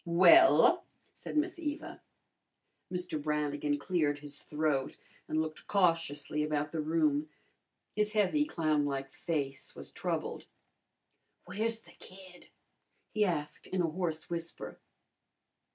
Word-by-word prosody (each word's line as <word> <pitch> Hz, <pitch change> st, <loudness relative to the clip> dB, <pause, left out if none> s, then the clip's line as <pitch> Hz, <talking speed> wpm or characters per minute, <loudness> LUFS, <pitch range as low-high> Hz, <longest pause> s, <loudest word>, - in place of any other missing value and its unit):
"Well?" 190 Hz, -, +7 dB, 0.3 s
said -, -, -6 dB
Miss 340 Hz, +3 st, 0 dB
Eva. 300 Hz, -2 st, -4 dB, 0.9 s
Mr. 180 Hz, -4 st, -3 dB
Brannigan 145 Hz, -1 st, 0 dB
cleared 150 Hz, -2 st, +1 dB
his 145 Hz, -1 st, -7 dB
throat 150 Hz, -3 st, -1 dB, 0.3 s
and 155 Hz, -, 0 dB
looked 155 Hz, 0 st, -4 dB
cautiously 165 Hz, -6 st, +1 dB
about 150 Hz, 0 st, -1 dB
the 160 Hz, -, -1 dB
room. 155 Hz, -1 st, +1 dB, 0.7 s
His 210 Hz, 0 st, +1 dB
heavy, 215 Hz, +8 st, +3 dB
clownlike 145 Hz, -, 0 dB
face 140 Hz, -5 st, -3 dB
was -, -, -7 dB
troubled. -, -, -3 dB, 1.0 s
"Where's 225 Hz, +2 st, -2 dB
the -, -, -18 dB
kid?" 185 Hz, -1 st, -14 dB, 0.6 s
he 215 Hz, -1 st, +2 dB
asked 150 Hz, -5 st, -3 dB
in 185 Hz, -1 st, 0 dB
a -, -, +2 dB
hoarse 165 Hz, -2 st, -2 dB
whisper. 170 Hz, -1 st, -6 dB
160 Hz, 115 wpm, -32 LUFS, 150-185 Hz, 1.0 s, Well